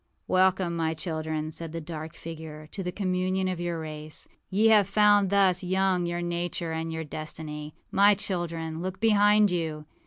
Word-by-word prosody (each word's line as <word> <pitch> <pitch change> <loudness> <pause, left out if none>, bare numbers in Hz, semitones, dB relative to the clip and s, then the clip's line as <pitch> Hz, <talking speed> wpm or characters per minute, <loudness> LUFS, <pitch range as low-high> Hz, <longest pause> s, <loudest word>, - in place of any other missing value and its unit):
âWelcome, 185 -1 +3
my 165 -1 -1
children,â 155 -1 -3
said 165 0 -6
the 165 - -3
dark 160 0 -7
figure, 155 -2 -8
âto 195 - -5
the 180 - -2
communion 185 0 0
of 185 -2 -2
your 175 -1 -2
race. 155 -1 -7 0.2
Ye 210 +4 +4
have 210 -3 +6
found 205 -1 +4
thus 195 -2 +3
young 185 -1 +1
your 175 0 -2
nature 175 -1 -2
and 160 0 -3
your 160 0 -3
destiny. 150 0 -6 0.2
My 200 +1 +6
children, 170 -5 -3
look 185 +1 -4
behind 210 -1 +5
you! 160 -3 -2
175 Hz, 165 wpm, -27 LUFS, 160-190 Hz, 0.2 s, have